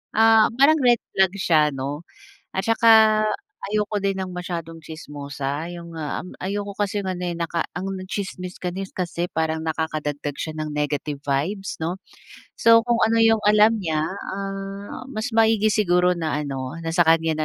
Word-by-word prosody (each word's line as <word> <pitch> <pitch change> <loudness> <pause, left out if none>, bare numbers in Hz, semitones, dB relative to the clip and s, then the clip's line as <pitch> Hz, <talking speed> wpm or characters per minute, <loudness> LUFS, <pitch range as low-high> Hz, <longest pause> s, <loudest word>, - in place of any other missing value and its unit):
ah, 220 0 +6
parang 305 +3 +5
red 245 -1 +5 0.2
flag 190 -1 +3
siya 165 -5 +3
'no 140 +3 -4 0.5
at 190 - -2
saka 220 -1 +6 0.5
ayoko 210 0 0
din 195 -1 +1
ng 185 -1 -4
masyadong 170 -2 -5
tsismosa 145 -1 -5
yung, 170 -1 -9
ah, 150 -2 -3
um, 180 - -10
ayoko 200 +1 -3
kasing 205 -1 -1
ano 180 -1 -3
eh, 175 -1 -3
naka 170 0 -1
ang 180 +3 -4 0.2
tsismis 185 -2 -5
ka 180 - -2
ni 195 - -3
s - - -12
kasi 175 -1 -3
parang 160 0 -1
nakakadagdag 155 -3 -3
siya 155 - -4
ng 155 - -3
negative 145 -1 -2
vibes, 165 +9 -2
'no? 165 +3 -2 0.6
So, 230 0 +6
kung 235 -1 +2
ano 225 +1 +3
yung 225 -1 +4
alam 215 +1 +5
niya, 155 -3 0
ah, 195 +2 -6
mas 225 -1 -4
maigi 220 -1 +4
siguro 180 -3 +3
na 160 -3 -2
ano 135 +1 -5
na 165 0 -4
sa 175 - +5
kanya 165 0 +3
180 Hz, 170 wpm, -23 LUFS, 160-210 Hz, 0.6 s, ah